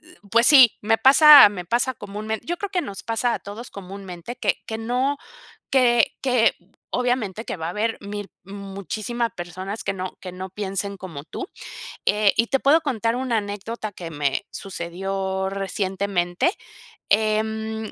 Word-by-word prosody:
Eh, - - -19
pues 230 +1 +5
sí, 260 -6 +8
me 225 +1 +2
pasa 285 0 +9
me 180 -4 -7
pasa 245 +6 +1
comúnmente 215 +1 -5
yo 345 +1 -2
creo 405 +1 -5
que 360 - 0
nos 200 - -7
pasa 230 +1 0
a - - -3
todos 210 +5 -9
comúnmente, 195 +2 -8
que 220 -5 -1
que 220 - -4
no 255 +5 -1 0.5
que 240 -4 +3
que 250 -4 +3 0.4
obviamente 245 -4 -1
que - - -5
va 160 0 -4
a - - -2
haber 225 +3 -1
1000 205 0 -7
muchísimas 200 +4 -4
personas 185 +4 -6
que 195 - -1
no 185 -1 -6
que 185 - -7
no 185 +1 -7
piensen 200 0 -3
como 165 -6 -8
tú. 375 - -7 0.6
Eh, 210 -1 +3
y 230 - +2
te 270 +2 +1
puedo 310 +4 +4
contar 230 -5 -1
una 250 -3 -1
anécdota 210 +2 -5
que 170 -3 -8
me 145 +4 -1
sucedió 190 +1 -4
recientemente. 195 - -1 0.6
Em, 220 +1 0
210 Hz, 160 wpm, -23 LUFS, 195-235 Hz, 0.6 s, pasa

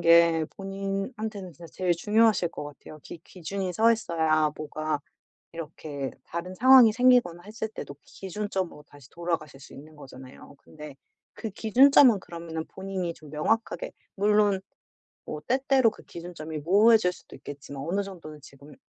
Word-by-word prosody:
게 165 -1 +5
본인한테는 195 +1 -5
진짜 170 +3 -12
제일 180 -2 0
중요하실 210 0 +3
것 150 - -7
같아요. 145 +1 -11
기 170 - -10
기준이 185 +1 -5
서 225 +4 +4
있어야 160 -7 +1
뭐가 155 0 -3 0.6
이렇게 150 -4 -6
다른 180 +2 -6
상황이 255 0 +8
생기거나 240 -8 +3
했을 220 +1 -5
때도 140 -9 -8
기준점으로 190 -5 -5
다시 145 -3 -17
돌아가실 165 -5 -4
수 - - -14
있는 155 +3 -13
거잖아요. 130 0 -13
근데 150 -2 -12 0.4
그 220 - -6
기준점은 240 +2 +5
그러면은 165 -2 -7
본인이 190 -3 -4
좀 155 -3 -15
명확하게 225 - -1 0.2
물론 205 -1 +3 0.7
뭐 150 - -6
때때로 260 -2 +3
그 - - -15
기준점이 165 -3 -7
모호해질 200 +4 +4
수도 - - -14
있겠지만 140 -1 -9
어느 185 +6 -1
정도는 165 -6 -10
지금 140 +1 -15
175 Hz, 345 characters per minute, -27 LUFS, 155-210 Hz, 0.7 s, 상황이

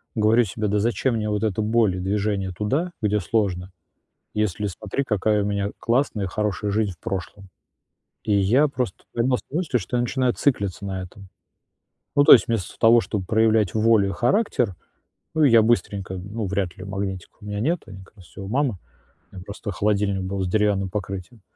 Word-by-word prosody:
говорю 110 +2 +4
себе: 105 +1 -3
"Да 105 +1 +1
зачем 120 +3 0
мне 105 -1 -1
вот 105 +1 -1
эта 110 0 0
боль 110 -3 +2
и - - -4
движение 100 0 -1
туда, 130 - -1
где 105 -1 +1
сложно, 95 -2 -1 0.6
если, 105 -1 -1
смотри, 105 +7 -3
какая 105 -3 +1
у - - -2
меня 100 0 -1
классная, 115 -5 0
хорошая 105 +1 -2
жизнь 105 -1 0
в 85 - -24
прошлом?". 95 +1 -6 0.7
И 105 - 0
я 110 +10 +4
просто 125 -8 -4
поймал 125 +2 +1
ся - - -20
на 155 - -1
мысли, 160 -8 0
что 125 - -3
я - - +2
начинаю 125 0 0
циклиться 100 -8 -1
на 95 -1 -3
этом. 95 +2 -11 0.9
Ну, 145 - +6
то - - +9
есть 120 - +8
вместо 115 -6 -3
того, 115 +1 +6
чтоб 105 -4 -3
проявлять 110 -2 +2
волю 110 -2 +4
и - - -2
характер, 120 - +1 0.6
ну, 160 -1 +2
и 140 - +6
я 115 -1 +7
быстренько 100 -4 0
ну, 100 +4 -5
вряд 95 -2 -2
ли, 95 - -8
магнитика 95 -2 -5
у 105 - -11
меня 105 0 -4
нету, 165 +9 0
они 95 -1 -10
как 100 - -22
раз 95 - -15
все 95 - -11
у 95 - -6
мамы. 130 -2 0 0.6
У - - -13
меня 90 - -9
просто 100 +1 -6
холодильник 100 -1 0
был 95 +1 -3
с 95 - -1
деревянным 100 -1 +1
покрытием. 100 +3 -6
105 Hz, 200 wpm, -23 LUFS, 95-115 Hz, 0.9 s, то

